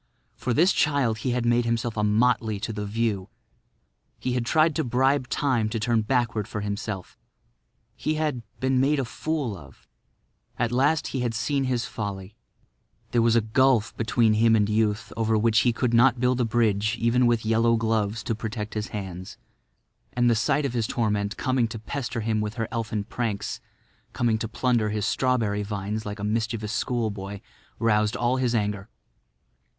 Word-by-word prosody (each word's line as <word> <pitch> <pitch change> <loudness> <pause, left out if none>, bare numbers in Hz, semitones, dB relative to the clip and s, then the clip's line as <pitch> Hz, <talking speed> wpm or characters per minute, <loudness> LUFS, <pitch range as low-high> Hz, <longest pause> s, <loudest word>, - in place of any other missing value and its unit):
For 125 - -3
this 170 - +4
child 135 -7 +1
he 130 - -2
had 120 -1 0
made 120 0 +3
himself 115 0 -1
a 105 - 0
motley 110 0 +2
to 115 -1 -3
the 105 -1 -4
view. 105 -2 -1 0.9
He 125 - -2
had 120 -2 -1
tried 155 +1 +3
to - - +1
bribe 130 +2 +1
Time 125 -7 +1
to 115 +1 -2
turn 115 +1 +1
backward 115 -2 0
for 110 -4 -4
himself; 100 -2 -5 0.8
he 155 - -1
had—been 130 -3 -1
made 140 +3 +3
a 135 - 0
fool 145 -3 -3
of. - - -15 0.7
At 120 -1 0
last 140 +5 +2
he 135 - -3
had 120 -2 -1
seen 140 +3 0
his 125 -2 0
folly. 100 -1 -6 0.8
There 120 - +3
was 115 0 +3
a 115 - +5
gulf 115 +1 +2
between 110 0 +2
him 115 +1 +4
and 105 -2 +3
youth 105 -1 0
over 110 0 +1
which 110 0 +3
he 120 - +3
could 120 0 -1
not 120 +1 +5
build 125 0 +2
a - - +2
bridge 110 -1 +1
even 115 +2 +3
with 115 -2 +1
yellow 115 +1 +3
gloves 110 -1 0
to 115 - -1
protect 110 -1 -5
his 105 0 -3
hands. 95 -3 -7 0.8
And 120 0 +2
the - - +5
sight 135 +6 +1
of 135 - -2
his 115 -3 0
torment 105 -3 -1
coming 130 -3 +1
to 115 - -7
pester 120 +1 -4
him 110 0 0
with 105 +1 -3
her 115 -2 -2
elfin 110 -3 -2
pranks—coming 110 +1 -4
to 110 - -2
plunder 120 -1 +1
his 105 -1 -1
strawberry 115 -5 +1
vines 105 +1 -4
like 105 +1 -5
a 105 - -7
mischievous 110 0 -1
schoolboy—roused 105 0 -2
all 120 +2 +1
his 125 -2 +1
anger. 105 -1 -2
115 Hz, 175 wpm, -25 LUFS, 105-125 Hz, 0.9 s, a